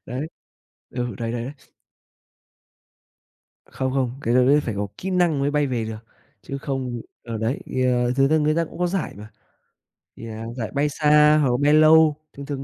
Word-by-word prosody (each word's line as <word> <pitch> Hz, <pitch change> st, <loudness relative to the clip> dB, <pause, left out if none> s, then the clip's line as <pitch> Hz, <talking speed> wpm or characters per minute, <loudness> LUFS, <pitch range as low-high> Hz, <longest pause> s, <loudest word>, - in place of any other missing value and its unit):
Đấy. 130 Hz, +6 st, -4 dB, 0.6 s
Ừ, 120 Hz, -3 st, -4 dB
đấy, 115 Hz, 0 st, -3 dB
đấy, 120 Hz, -1 st, -3 dB
đấy. 135 Hz, -, -6 dB, 2.1 s
Không, 130 Hz, 0 st, -3 dB
không, 130 Hz, -3 st, 0 dB
cái 120 Hz, -3 st, 0 dB
đó 125 Hz, -, +5 dB
đấy 145 Hz, +3 st, +4 dB
phải 115 Hz, -7 st, -4 dB
có 100 Hz, +1 st, -2 dB
kỹ 190 Hz, -, -4 dB
năng 175 Hz, -5 st, +2 dB
mới 140 Hz, -, +1 dB
bay 150 Hz, 0 st, +1 dB
về 120 Hz, -4 st, -2 dB
được, 110 Hz, 0 st, -5 dB, 0.5 s
chứ 140 Hz, -, -6 dB
không 130 Hz, -4 st, -4 dB, 0.2 s
ờ, 115 Hz, -2 st, -5 dB
đấy, 115 Hz, +6 st, -1 dB, 0.2 s
à, 125 Hz, -1 st, +2 dB
thật 135 Hz, 0 st, +4 dB
ra 160 Hz, -, +4 dB
người 155 Hz, 0 st, +1 dB
ta 165 Hz, 0 st, +1 dB
cũng -, -, -12 dB
có 180 Hz, -, +1 dB
giải 185 Hz, -1 st, -3 dB
mà, 105 Hz, +2 st, -11 dB, 0.9 s
thì, 115 Hz, -, -9 dB
à, 110 Hz, 0 st, -7 dB
giải 115 Hz, -4 st, -4 dB
bay 145 Hz, +1 st, +1 dB
xa 150 Hz, 0 st, +4 dB
hoặc 140 Hz, -, +2 dB
là 125 Hz, -, +1 dB
bay 145 Hz, +1 st, +4 dB
lâu, 155 Hz, 0 st, +6 dB, 0.2 s
thường 140 Hz, -, -9 dB
thường 140 Hz, -1 st, -5 dB
135 Hz, 200 wpm, -23 LUFS, 120-150 Hz, 2.1 s, lâu